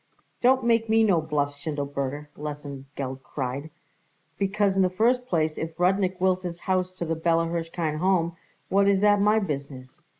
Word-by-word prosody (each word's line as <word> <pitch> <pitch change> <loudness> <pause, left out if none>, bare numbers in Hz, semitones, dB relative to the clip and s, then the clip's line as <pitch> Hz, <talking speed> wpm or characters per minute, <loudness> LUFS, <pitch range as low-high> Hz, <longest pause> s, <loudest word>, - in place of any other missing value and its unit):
"Don't 260 +1 +4
make 230 -1 +2
me 225 0 +5
no 185 -7 +3
bluffs, 145 -2 -1
Schindelberger," 145 -1 -3
Lesengeld 140 -2 -6
cried, 135 +2 -4 0.7
"because, 200 0 +1
in 195 - +3
the 185 - +3
first 245 +7 +1
place, 155 -5 0
if 160 +1 -5
Rudnik 185 0 +2
wills 185 0 +2
his 175 -2 -5
house 185 -1 0
to 180 -2 -4
the 165 - -1
Bella 165 +1 +2
Hirshkind 165 -2 -2
Home, 175 -2 +1 0.3
what 200 +1 +3
is 195 -1 +3
that 205 -1 +4
my 210 +2 +4
business? 140 -5 -5
170 Hz, 165 wpm, -26 LUFS, 150-195 Hz, 0.7 s, me